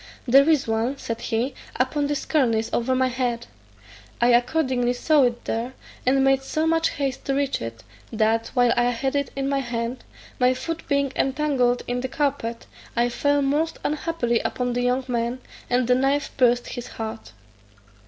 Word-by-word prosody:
"There 275 +5 +6
is 300 -6 +3
one," 225 +5 0
said 230 -3 -5
he, 240 +4 -1 0.2
"upon 285 +3 0
this 290 0 -2
cornice 230 -7 +1
over 255 +2 +1
my 260 0 +2
head:" 240 -2 -2 0.7
I 240 - +4
accordingly 245 0 +2
saw 300 +4 +3
it 240 -1 -2
there, 235 +3 -2 0.3
and 270 +1 +4
made 270 0 +3
so 310 +4 -1
much 325 0 +2
haste 275 -3 -3
to 275 - 0
reach 280 -1 0
it, 115 0 -7 0.3
that, 225 0 +1
while 245 -1 +4
I 240 - +3
had 255 +3 -1
it 280 0 0
in 275 0 -1
my 275 0 +1
hand, 240 -1 -3 0.4
my 250 0 +4
foot 330 +5 -5
being 280 -1 +1
entangled 265 -3 +1
in 245 0 -2
the 260 - -2
carpet, 255 -5 -2 0.3
I 240 0 +2
fell 285 +3 +1
most 300 +4 0
unhappily 295 -6 0
upon 245 -1 -2
the 245 - 0
young 250 +1 +1
man, 240 0 -1 0.3
and 245 0 +2
the 250 - +5
knife 270 +3 +1
pierced 245 -2 +3
his 245 - -6
heart. 225 0 -6
255 Hz, 175 wpm, -24 LUFS, 240-280 Hz, 0.7 s, There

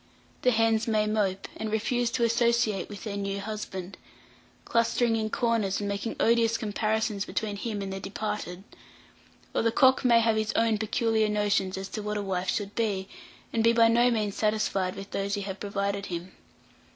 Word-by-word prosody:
The 250 - +4
hens 225 -1 +2
may 215 -1 +2
mope, 205 -3 0
and 220 -1 -3
refuse 235 +2 0
to 235 - +1
associate 235 -4 +2
with 205 -3 -8
their 205 -2 -4
new 200 0 -2
husband, 200 -3 -6 0.7
clustering 230 0 +2
in 220 -1 -1
corners, 225 -5 0
and 205 - -3
making 200 +3 -3
odious 230 0 +3
comparisons 215 -1 -1
between 210 0 -3
him 205 -1 -3
and 195 0 -4
the 195 - -4
departed; 195 -2 -4 0.9
or - - +1
the 230 - +2
cock 260 +3 +4
may 235 -2 +6
have 225 -1 +2
his 215 0 0
own 225 -2 +2
peculiar 220 0 +1
notions 205 -2 +1
as 190 0 -4
to 215 - -4
what 210 0 -2
a 205 - -2
wife 185 -1 -2
should 205 -1 -2
be, 200 -4 -1 0.4
and 225 - +1
be 230 0 +5
by 230 -1 +5
no 240 +2 +4
means 215 -4 0
satisfied 210 -4 0
with 195 0 -8
those 200 +1 -1
you 200 - -3
have 195 0 -5
provided 200 0 -2
him. 175 +1 -5
215 Hz, 185 wpm, -28 LUFS, 200-230 Hz, 0.9 s, may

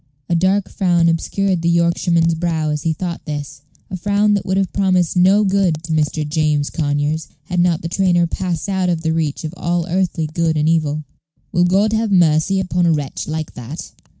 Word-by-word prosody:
A - - +1
dark 185 +4 +2
frown 175 -3 +1
obscured 180 +2 0
the 170 - +1
Yorkshireman's 170 0 +2
brow 160 -2 -1
as 150 0 -2
he 165 - 0
thought 170 +2 -4
this 145 -2 -6 0.3
a - - -3
frown 205 +3 +1
that 200 - -1
would 190 0 0
have 195 -2 -1
promised 185 -4 +1
no 190 +4 +4
good 190 -5 +1
to 165 - -6
Mr. 155 0 0
James 150 -2 0
Conyers 145 +1 -1 0.2
had 180 +2 -3
not 175 -2 +2
the - - -2
trainer 175 -1 +2
passed 170 0 -3
out 190 -2 0
of 165 -2 -1
the 160 -1 0
reach 160 -2 -2
of 155 0 -5
all 175 -1 -1
earthly 180 -2 0
good 160 0 -1
and 150 +1 +1
evil. 155 -2 +1 0.5
"Will 175 -2 +3
God 200 +4 +2
have 220 -1 0
mercy 175 +1 +3
upon 180 -2 0
a - - +4
wretch 145 -4 -3
like 155 0 -4
that?" 125 +7 -8
170 Hz, 200 wpm, -18 LUFS, 155-185 Hz, 0.5 s, no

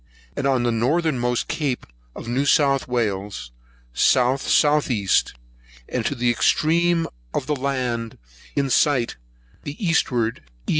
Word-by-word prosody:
and 140 - -1 0.2
the 120 - +2
northernmost 125 0 0
cape 140 -6 -2 0.3
of - - -8
New 125 +4 0
South 135 -2 +3
Wales, 100 - -3 0.4
S.S.E.; 130 - +2 0.8
and 125 - -2
to 140 - -2
the 120 -1 +1
extreme 165 +6 +2 0.3
of - - -1
the 150 - -1
land 125 -4 -3 0.4
in 140 -2 0
sight, 130 -5 +2 0.4
the 145 +1 -7
eastward 120 -9 0 0.2
E. - - -8
130 Hz, 115 wpm, -22 LUFS, 120-145 Hz, 0.8 s, South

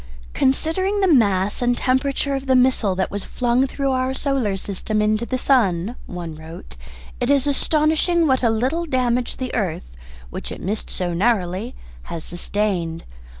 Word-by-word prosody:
"Considering 375 +9 +1
the 385 - +3
mass 205 - +3
and 245 0 +2
temperature 275 +2 0
of 270 0 -3
the 260 - +4
missile 250 -6 +3
that 190 - -1
was 200 -1 -4
flung 250 +2 +1
through 275 0 -1
our 260 0 0
solar 265 -9 0
system 205 +3 -2
into 215 +2 +1
the 255 - -1
sun," 225 -6 +2
one 175 -3 -6
wrote, 160 - -11 0.4
"it 245 - -1
is 280 -1 +3
astonishing 310 +4 +2
what 260 -3 +2
a 235 - +3
little 260 +10 0
damage 250 -3 0
the 255 -1 -4
earth, 160 - -3 0.4
which - - -6
it - - -6
missed 210 +4 -3
so 175 -1 -2
narrowly, 195 +2 0 0.3
has 165 -2 -6
sustained. 175 -2 -2
240 Hz, 160 wpm, -21 LUFS, 190-270 Hz, 0.4 s, the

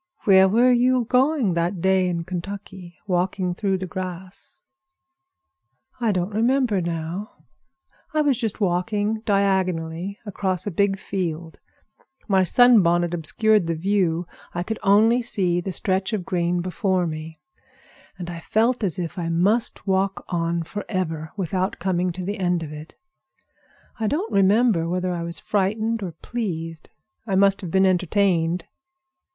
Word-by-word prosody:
"Where 190 -1 +6
were 240 +5 +4
you 250 0 +3
going 255 - +2
that 170 +2 -1
day 190 +1 +2
in 170 -1 -2
Kentucky, 185 0 -7
walking 180 -1 0
through 195 0 -1
the 185 - -4
grass?" 185 0 -7 1.4
"I 230 -3 +1
don't 185 +1 -2
remember 230 -2 +2
now. 170 +4 -4 0.8
I 310 - +1
was 290 -3 +3
just 225 -4 -3
walking 205 +3 0
diagonally 190 -2 0
across 185 -3 -2
a 205 - -2
big 195 +2 +1
field. 170 -4 -4 0.7
My 195 -3 +3
sun 245 +5 +6
bonnet 175 0 +1
obstructed 200 +4 +2
the 165 - 0
view. 175 -1 0 0.3
I 175 - -1
could 220 +4 -4
see - - -2
only 225 +5 +5 0.4
the 190 - -4
stretch 190 +3 0
of 195 -5 -2
green 175 -1 0
before 185 0 0
me, 160 0 -6 0.8
and 180 -2 -6
I 170 -1 -6
felt 230 +7 +1
as 185 -6 0
if 180 +1 -4
I 170 -1 -2
must 205 +10 +1
walk 195 0 0
on 170 -1 -1
forever, 165 -5 -4
without 185 0 -1
coming 180 0 0
to 185 +1 -6
the 200 +2 -3
end 175 -2 0
of 150 -1 -7
it. 150 +1 -10 1.0
I 220 - 0
don't 335 - -2
remember 195 -3 +3
whether 180 0 -1
I 170 - -3
was 170 -1 -3
frightened 215 +6 -1
or 180 -4 -5
pleased. 165 -9 -4 0.4
I 195 - 0
must 195 +1 +3
have 180 - -5
been 190 +3 +3
entertained. 180 -2 +1
190 Hz, 145 wpm, -23 LUFS, 175-205 Hz, 1.4 s, Where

